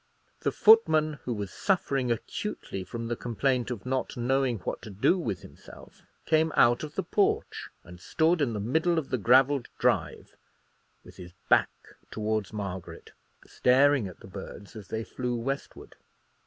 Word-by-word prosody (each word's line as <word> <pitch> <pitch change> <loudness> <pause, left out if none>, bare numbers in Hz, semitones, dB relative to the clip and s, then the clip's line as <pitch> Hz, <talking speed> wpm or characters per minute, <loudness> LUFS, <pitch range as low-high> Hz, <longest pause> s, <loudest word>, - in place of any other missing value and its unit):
The - - -1
footman, 160 - +4
who 125 - -1
was 100 -2 -5
suffering 140 - 0
acutely 95 -3 -4
from 115 +6 -6
the 120 - -2
complaint 125 +1 -1
of 120 -4 -6
not 130 0 -2
knowing 130 0 +1
what - - -4
to - - -9
do 100 - +2
with 100 - -4
himself, - - -15 0.2
came 160 0 +2
out 120 0 +4
of 150 0 -7
the 190 - -1
porch 200 +4 0
and 85 +1 -13
stood 160 +1 +1
in 125 -5 +1
the 105 - -3
middle 160 - +1
of 155 -4 -3
the 130 - 0
gravelled 130 +4 +4
drive, - - -1 0.7
with - - -15
his 90 -2 -11 0.2
back - - +5 0.4
towards 110 -1 -2
Margaret, 100 -4 -7 0.3
staring 135 -2 +3
at 90 - -12
the - - -11
birds 100 +2 -10
as 105 -2 -9
they 110 0 -3
flew 125 +1 -4
westward. 135 +4 -5
125 Hz, 160 wpm, -28 LUFS, 105-145 Hz, 0.7 s, back